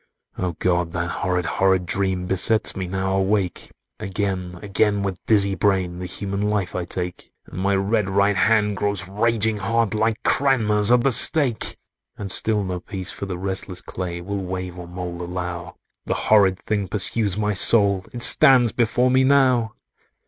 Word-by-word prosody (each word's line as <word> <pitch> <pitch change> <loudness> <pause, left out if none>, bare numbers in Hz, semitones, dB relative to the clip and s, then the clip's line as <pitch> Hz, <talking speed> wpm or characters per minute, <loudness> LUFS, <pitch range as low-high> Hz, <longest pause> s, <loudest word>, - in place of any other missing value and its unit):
"Oh 90 -2 -3
God! 85 0 -1
that 85 -1 -3
horrid, 90 -1 -2
horrid 95 +1 +1
dream 95 0 -2
Besets 100 +4 +3
me 95 -1 -4
now 95 +1 -2
awake! 95 -2 -1 0.3
Again—again, 100 0 -2
with 95 -2 -5
dizzy 100 -3 +2
brain, 95 -2 -1
The 90 - -5
human 100 +2 -4
life 105 -3 -1
I 90 -1 -3
take: 90 0 -5
And - - -9
my 100 +1 +1
red 100 +1 0
right 100 +1 +1
hand 105 0 +2
grows 100 -2 -2
raging 110 +2 0
hot, 110 +1 -1
Like 110 +1 -1
Cranmer's 110 -6 +2
at 125 -1 +4
the 135 - +2
stake. 130 0 +3 0.4
"And 100 -2 -4
still 105 0 +1
no 90 -1 -4
peace 95 -1 -6
for 100 - -7
the 90 -2 -5
restless 95 0 -4
clay, 85 -2 -6
Will 100 +2 -5
wave 90 -1 -6
or 85 - -9
mould 90 0 -7
allow; 90 0 -6 0.3
The - - -1
horrid 100 -3 +3
thing 100 -1 -3
pursues 100 +1 0
my 105 -1 -1
soul— 100 -1 +3
It 120 -1 -3
stands 130 -6 +6
before 125 +3 +1
me 130 +1 +3
now!" 130 -5 +2
100 Hz, 165 wpm, -21 LUFS, 90-110 Hz, 0.4 s, stands